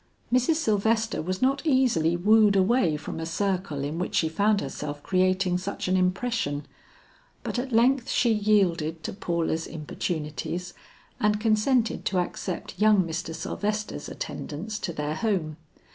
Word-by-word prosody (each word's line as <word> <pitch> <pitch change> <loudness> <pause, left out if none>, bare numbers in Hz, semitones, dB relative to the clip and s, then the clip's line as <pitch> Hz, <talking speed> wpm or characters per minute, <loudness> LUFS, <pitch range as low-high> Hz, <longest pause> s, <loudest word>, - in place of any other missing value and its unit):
Mrs. 255 +6 +3
Sylvester 220 -5 +1
was 185 +7 -3
not 275 +1 +2
easily 245 - +2
wooed 210 +2 +5
away 190 -5 +3
from 155 - -6
a 160 - -3
circle 180 -5 -1
in 150 +4 -3
which 180 - -3
she 160 - +2
found 205 +5 +2
herself 145 0 -5
creating 185 -1 +2
such 200 +1 -4
an 185 - +2
impression, 185 -5 0 0.8
but - - -2
at 260 +1 -4
length 245 +2 +3
she 235 -2 +3
yielded 180 -7 +1
to - - -4
Paula's 170 -4 -1
importunities, 160 +2 -4 0.5
and 210 0 +2
consented 225 +2 +2
to 190 - 0
accept 180 +1 -3
young 210 -2 +5
Mr. 165 -1 -4
Sylvester's 210 +5 -3
attendance 210 +9 -5
to - - -3
their 150 -1 -3
home. 165 -6 -1
190 Hz, 145 wpm, -26 LUFS, 165-215 Hz, 0.8 s, wooed